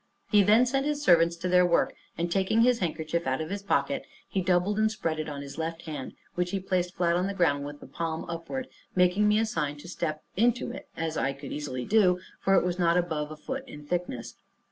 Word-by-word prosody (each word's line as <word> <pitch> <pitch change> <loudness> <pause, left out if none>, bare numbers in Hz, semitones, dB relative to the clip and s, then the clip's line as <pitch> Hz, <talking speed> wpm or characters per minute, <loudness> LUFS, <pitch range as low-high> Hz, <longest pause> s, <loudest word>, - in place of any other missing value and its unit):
He 210 -2 +7
then 215 +5 +5
sent 270 +3 0
his 295 -1 0
servants 170 - +5
to 170 +2 -4
their 180 0 +5
work, 175 -1 +2 0.2
and 170 +1 -1
taking 195 +4 +2
his 245 0 +4
handkerchief 165 -1 -2
out 130 0 +1
of 160 +2 -4
his 200 0 -3
pocket, 200 - 0 0.2
he 190 - -1
doubled 185 +3 +2
and 220 0 +3
spread 165 -7 -2
it 155 - -3
on 140 -1 -5
his 140 +3 -8
left 165 +1 -3
hand, 150 -5 -6 0.2
which 180 0 -1
he 195 - -1
placed 180 -1 -1
flat 170 -2 +2
on 180 +2 +1
the 200 - -3
ground 145 -6 +2
with 145 0 -8
the - - -9
palm 165 -1 -3
upward, 170 +11 -4 0.3
making 180 +3 +4
me 210 0 +4
a 225 - +3
sign 150 -8 -2
to 145 - -11
step 155 -3 -3
into 240 +3 +2
it, - - -9
as 160 0 -2
I 135 - 0
could 140 0 -9
easily 130 -4 -4
do, 190 -4 +4 0.2
for 195 - +3
it 185 - +4
was 180 0 -1
not 170 0 +4
above 160 -4 -1
a 155 - -8
foot 265 - -5
in 150 -9 -10
thickness. 175 -8 -3
175 Hz, 235 wpm, -28 LUFS, 155-200 Hz, 0.3 s, He